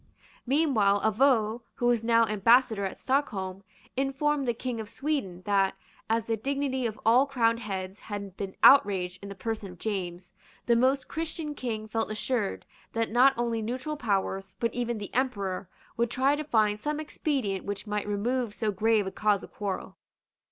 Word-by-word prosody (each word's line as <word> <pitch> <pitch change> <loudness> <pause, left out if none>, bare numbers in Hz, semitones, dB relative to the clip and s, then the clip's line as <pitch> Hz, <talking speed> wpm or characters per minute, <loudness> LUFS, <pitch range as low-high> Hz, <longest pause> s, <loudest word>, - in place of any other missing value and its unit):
Meanwhile 240 -9 +3
Avaux, 225 0 +2
who 245 - -2
was 240 -2 +3
now 230 0 +4
Ambassador 220 0 +3
at 190 - -5
Stockholm, 200 -9 -1 0.3
informed 275 +1 0
the 240 - +2
King 245 0 -4
of 215 -2 -6
Sweden, 230 - -3
that, 195 -2 +2 0.3
as 225 0 +1
the 230 - 0
dignity 265 +1 -1
of 220 -1 -7
all 245 +5 +5
crowned 230 -4 +2
heads 195 -3 -5
had 200 -3 -6
been 195 -1 -5
outraged 190 -8 +5
in 200 - -8
the 200 - -7
person 215 -1 -4
of 180 - -13
James, 180 -3 -4 0.3
the 235 - +4
Most 260 +3 +2
Christian 320 -1 -4
King 220 -6 -4
felt 225 +1 -1
assured 215 -1 -2 0.3
that 225 -1 -1
not 255 +4 +5
only 235 -1 0
neutral 255 +7 -3
powers, 195 -6 -2
but 230 -2 0
even 240 -1 -2
the 205 -1 -7
Emperor, 200 -8 -1 0.3
would 235 0 +1
try 265 +4 +2
to 305 - -3
find 215 -7 +2
some 300 +5 -2
expedient 270 - -2
which 200 +1 -5
might 210 -1 -2
remove 220 +2 -1
so 220 -2 0
grave 215 +1 +2
a 190 - -4
cause 205 0 +1
of - - -12
quarrel. 200 -2 -4
225 Hz, 175 wpm, -28 LUFS, 200-255 Hz, 0.3 s, all